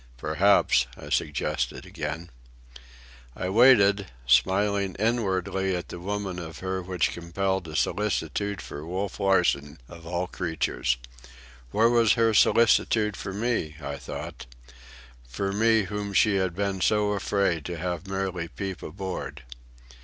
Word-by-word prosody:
"Perhaps," 80 -2 +3
I - - -10
suggested 75 -2 -1
again. 85 0 -5 1.0
I 90 - -3
waited, 100 -3 +5 0.2
smiling 100 +8 +2
inwardly 95 -4 0
at 90 - -5
the - - -7
woman 100 -1 -3
of 80 -2 -8
her 95 0 -3
which 90 -1 0
compelled 95 +1 -2
a 80 - -7
solicitude 100 +1 -1
for 70 - -8
Wolf 95 +4 -4
Larsen, 85 -6 +2
of 85 -1 -12
all 90 +1 -1
creatures. 80 -8 -1 0.7
Where 110 - +3
was 115 -2 +4
her 115 -2 +2
solicitude 110 -1 +4
for 100 - -6
me, 100 -7 -1
I 70 -2 -5
thought,—for - - -8
me 110 +1 +3
whom 100 +1 -4
she 100 +1 +4
had 95 -2 -1
been 100 -1 -2
afraid 100 -5 +1
to 90 -1 -4
have 90 +1 -4
merely 95 -3 -2
peep 95 -1 -6
aboard? 95 +3 -6
95 Hz, 125 wpm, -26 LUFS, 85-100 Hz, 1.0 s, waited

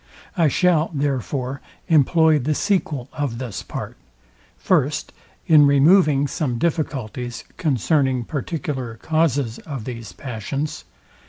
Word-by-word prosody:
I 170 -4 +3
shall, 165 +2 +2
therefore, 135 -1 -2 0.3
employ 160 0 +4
the 150 +4 -1
sequel 150 - 0
of 145 -6 -3
this 115 -5 -5
part, - - -7 0.6
First, - - 0 0.3
In 150 -3 +6
removing 145 0 +5
some 130 -3 -2
difficulties, 125 -6 -2
concerning 135 - +1
particular 140 -5 -4
causes 140 -4 0
of 135 -8 -7
these 115 -4 -7
passions. 135 +4 -5
140 Hz, 105 wpm, -22 LUFS, 125-155 Hz, 0.6 s, In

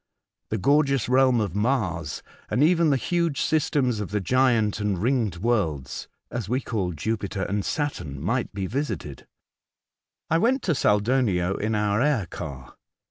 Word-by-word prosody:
The 110 - -1
gorgeous 140 +2 +2
realm 130 -1 +4
of 100 -6 -1
Mars, 100 - -1 0.3
and 135 - +2
even 170 0 +4
the 140 - +3
huge 170 -1 0
systems 135 -6 +1
of 105 - -4
the 105 - -1
giant 115 -1 +2
and 105 -2 0
the - - -6
ringed 115 -3 +1
worlds 85 - -1 0.2
(as 115 -5 -4
we 125 +2 +1
call 100 -8 -2
Jupiter 100 +3 -3
and 100 +3 -1
Saturn) 90 - -3
might 115 - -1
be 100 -2 -3
visited. 105 - -4 1.0
I 165 - +2
went 255 +6 +2
to 170 - +2
Saldonio 105 -6 +2
in 110 +1 -1
our 105 +1 +1
air 140 -8 +2
car. 70 -6 -8
110 Hz, 155 wpm, -25 LUFS, 95-135 Hz, 1.0 s, realm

